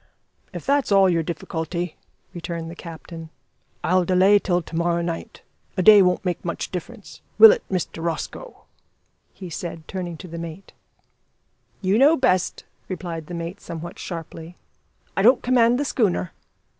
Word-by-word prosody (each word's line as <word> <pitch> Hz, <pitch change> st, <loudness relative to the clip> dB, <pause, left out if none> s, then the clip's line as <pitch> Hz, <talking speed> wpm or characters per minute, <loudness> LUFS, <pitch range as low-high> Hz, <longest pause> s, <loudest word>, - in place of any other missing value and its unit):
"If -, -, -8 dB
that's 280 Hz, -4 st, +1 dB
all 195 Hz, -1 st, +6 dB
your 170 Hz, -2 st, +2 dB
difficulty," 165 Hz, +1 st, -4 dB, 0.4 s
returned 170 Hz, -1 st, -5 dB
the -, -, -9 dB
captain, 165 Hz, -1 st, -9 dB, 0.5 s
"I'll 185 Hz, +1 st, +3 dB
delay 185 Hz, +3 st, +5 dB
till 180 Hz, -3 st, 0 dB
to 165 Hz, -, -9 dB
morrow 170 Hz, 0 st, +1 dB
night. 170 Hz, -1 st, -6 dB, 0.3 s
A 185 Hz, -, +1 dB
day 210 Hz, +1 st, +9 dB
won't 180 Hz, +1 st, +2 dB
make 180 Hz, -1 st, -2 dB
much 170 Hz, -1 st, -4 dB
difference 200 Hz, +4 st, -8 dB, 0.2 s
will 445 Hz, -1 st, +11 dB
it, 475 Hz, 0 st, 0 dB
Mr 180 Hz, -3 st, -3 dB
Rosco?" 170 Hz, -, -5 dB, 0.7 s
he 185 Hz, -3 st, -10 dB
said, 165 Hz, -1 st, -6 dB
turning 180 Hz, -3 st, -5 dB
to 180 Hz, -, -10 dB
the 170 Hz, 0 st, -7 dB
mate. 170 Hz, +3 st, -9 dB, 1.1 s
"You 195 Hz, +4 st, +2 dB
know 300 Hz, +5 st, +6 dB
best" 185 Hz, -8 st, +1 dB, 0.2 s
replied 170 Hz, -4 st, -5 dB
the 175 Hz, -, -6 dB
mate 170 Hz, +4 st, -6 dB
somewhat 170 Hz, +1 st, -8 dB
sharply, 165 Hz, 0 st, -7 dB, 0.6 s
"I -, -, +1 dB
don't 245 Hz, +5 st, +5 dB
command 245 Hz, -1 st, +4 dB
the 290 Hz, -, 0 dB
schooner." 195 Hz, -, 0 dB
180 Hz, 155 wpm, -23 LUFS, 170-195 Hz, 1.1 s, will